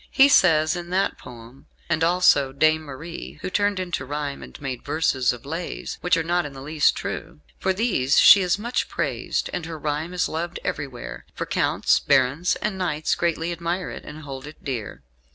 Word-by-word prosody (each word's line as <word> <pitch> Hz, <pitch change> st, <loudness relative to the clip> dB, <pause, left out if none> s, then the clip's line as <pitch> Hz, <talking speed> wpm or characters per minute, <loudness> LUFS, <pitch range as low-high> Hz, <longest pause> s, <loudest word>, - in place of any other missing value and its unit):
He 270 Hz, +1 st, +6 dB
says, 160 Hz, -, +4 dB
in 175 Hz, 0 st, -6 dB
that 190 Hz, +2 st, 0 dB
poem, 120 Hz, +2 st, -13 dB, 0.2 s
"And 165 Hz, -1 st, +1 dB
also 165 Hz, -6 st, +4 dB
Dame 155 Hz, +3 st, +3 dB
Marie, 155 Hz, +3 st, -8 dB
who 185 Hz, -, -3 dB
turned 205 Hz, 0 st, +1 dB
into 175 Hz, -7 st, -3 dB
rhyme 145 Hz, +1 st, -4 dB
and -, -, -11 dB
made 130 Hz, -3 st, -5 dB
verses 150 Hz, -5 st, +1 dB
of 125 Hz, 0 st, -9 dB
'Lays' 165 Hz, +4 st, -5 dB
which 180 Hz, 0 st, +3 dB
are 165 Hz, -, 0 dB
not 175 Hz, +2 st, +1 dB
in 145 Hz, -, -7 dB
the 135 Hz, -, -9 dB
least 150 Hz, +1 st, +2 dB
true. 75 Hz, -, -6 dB, 0.2 s
For 190 Hz, -, +1 dB
these 185 Hz, -, +1 dB
she 200 Hz, -, +9 dB
is 180 Hz, 0 st, +1 dB
much 235 Hz, +4 st, -2 dB
praised, -, -, -2 dB
and 170 Hz, -2 st, -3 dB
her 165 Hz, -1 st, -6 dB
rhyme 155 Hz, +4 st, -3 dB
is 180 Hz, -, +1 dB
loved 170 Hz, +2 st, -4 dB
everywhere; 135 Hz, -4 st, -5 dB
for -, -, -3 dB
counts, -, -, +2 dB
barons, 135 Hz, +7 st, +2 dB
and 210 Hz, -3 st, -2 dB
knights 155 Hz, -4 st, 0 dB
greatly 170 Hz, 0 st, -1 dB
admire 170 Hz, +2 st, -3 dB
it, -, -, -8 dB
and 155 Hz, +1 st, -10 dB
hold 135 Hz, -1 st, -7 dB
it 150 Hz, -, -13 dB
dear. 120 Hz, -, -5 dB
160 Hz, 190 wpm, -24 LUFS, 140-180 Hz, 0.2 s, she